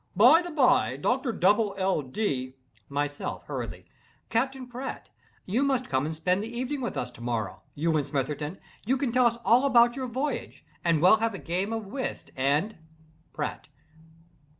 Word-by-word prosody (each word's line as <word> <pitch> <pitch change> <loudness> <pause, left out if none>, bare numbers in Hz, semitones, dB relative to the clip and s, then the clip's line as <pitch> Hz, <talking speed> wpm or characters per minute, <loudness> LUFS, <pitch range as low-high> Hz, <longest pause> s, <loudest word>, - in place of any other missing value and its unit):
By 250 - +7
the 350 - -6
by, 250 - +3
Doctor 250 - 0
Dubble 205 +1 +2
L. 190 -4 +1
Dee—" 130 -4 -2 0.3
MYSELF. 145 +1 -3
(Hurriedly.) - - -5 0.4
"Captain 265 +3 0
Pratt, 250 +2 -7 0.3
you 215 +8 0
must 265 -3 +1
come 130 +2 +1
and 160 - -4
spend 180 +4 +1
the 225 +2 -5
evening 255 +4 -3
with 240 - -3
us 125 0 -3
to 120 - -14
morrow—you 120 - -2
and 145 -2 0
Smitherton—you 150 - -3
can 260 -2 -1
tell 250 0 +5
us 235 0 -1
all 245 +3 +5
about 240 -3 +5
your 260 -1 -3
voyage, 265 +5 -4 0.2
and 165 -2 +2
we'll 185 +4 +7
have 225 -1 -1
a - - -4
game 185 +4 -2
of 225 -1 -3
whist 255 +6 -5
and—" 145 +10 0 0.5
PRATT. 150 0 -5
205 Hz, 165 wpm, -27 LUFS, -, 0.5 s, By